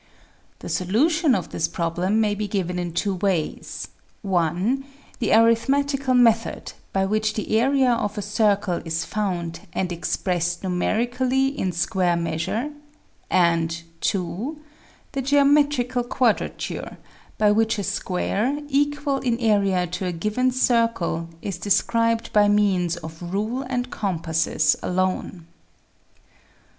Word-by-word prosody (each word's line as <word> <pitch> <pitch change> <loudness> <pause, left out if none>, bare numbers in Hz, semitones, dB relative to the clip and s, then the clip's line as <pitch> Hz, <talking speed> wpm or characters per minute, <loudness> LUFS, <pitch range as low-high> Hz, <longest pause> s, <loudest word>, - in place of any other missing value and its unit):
The - - -7
solution 280 - +2
of 185 - -3
this 160 - -1
problem 175 +5 -1
may 210 -2 +2
be 210 0 -3
given 180 -3 -2
in 175 -1 -3
two 195 +4 -1
ways: 185 -4 -2 0.4
(1) 190 - 0 0.4
the 240 - 0
arithmetical 270 +4 +3
method, 230 -2 +2 0.2
by 195 0 +1
which 215 +1 0
the 215 0 -1
area 265 +1 +3
of 210 -2 -2
a 205 - -2
circle 205 -3 +1
is 165 0 -2
found 175 -5 -3
and 185 -1 -1
expressed 175 0 -1
numerically 245 +8 +1
in 270 -10 -2
square 175 +1 +1
measure, 170 - -2 0.6
and 170 -2 +2 0.2
(2) 205 - -2 0.5
the 275 - -2
geometrical 280 -2 +3
quadrature, 240 -2 -1 0.4
by 210 -1 +4
which 225 +1 +2
a 200 - -2
square, 200 +7 -1
equal 290 0 +1
in 240 -3 0
area 200 -6 +2
to 180 +2 -4
a - - -1
given 215 +9 0
circle, 230 -10 +1
is 190 -4 -4
described 230 +3 +1
by 210 -1 +5
means 190 -4 +2
of 160 0 -9
rule 210 +8 -2
and 250 -1 -2
compasses 165 -5 0
alone. 185 -1 -2
205 Hz, 125 wpm, -23 LUFS, 180-245 Hz, 0.6 s, by